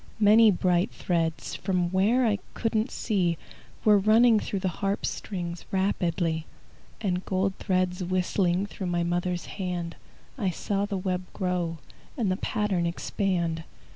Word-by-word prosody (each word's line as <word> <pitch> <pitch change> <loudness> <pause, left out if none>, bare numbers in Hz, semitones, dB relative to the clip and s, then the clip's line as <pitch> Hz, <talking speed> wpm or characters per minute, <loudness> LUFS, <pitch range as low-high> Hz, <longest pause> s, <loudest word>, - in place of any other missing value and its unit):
Many 215 +1 +7
bright 180 -2 +2
threads, 165 -2 -1
From 180 -2 0
where 215 +7 +3
I 210 -3 +2 0.2
couldn't 225 +1 0
see, 180 -7 0 0.5
Were 210 -2 +7
running 220 +2 +5
through 195 -2 -3
the 185 0 -3
harp 200 0 0
strings 175 -4 -4
Rapidly, 170 -4 0 0.5
And 185 -3 -1
gold 190 0 0
threads 185 -1 0
whistling 185 +1 +1
Through 195 -2 -6
my 175 -1 0
mother's 175 0 -1
hand. 180 -3 -4 0.4
I 200 -5 +1
saw 200 +3 -1
the 200 -2 -2
web 185 -1 -2
grow, 180 -3 -1 0.4
And 215 -7 +1
the 185 - 0
pattern 195 -5 0
expand. 170 -2 -1
185 Hz, 140 wpm, -27 LUFS, 175-205 Hz, 0.5 s, Many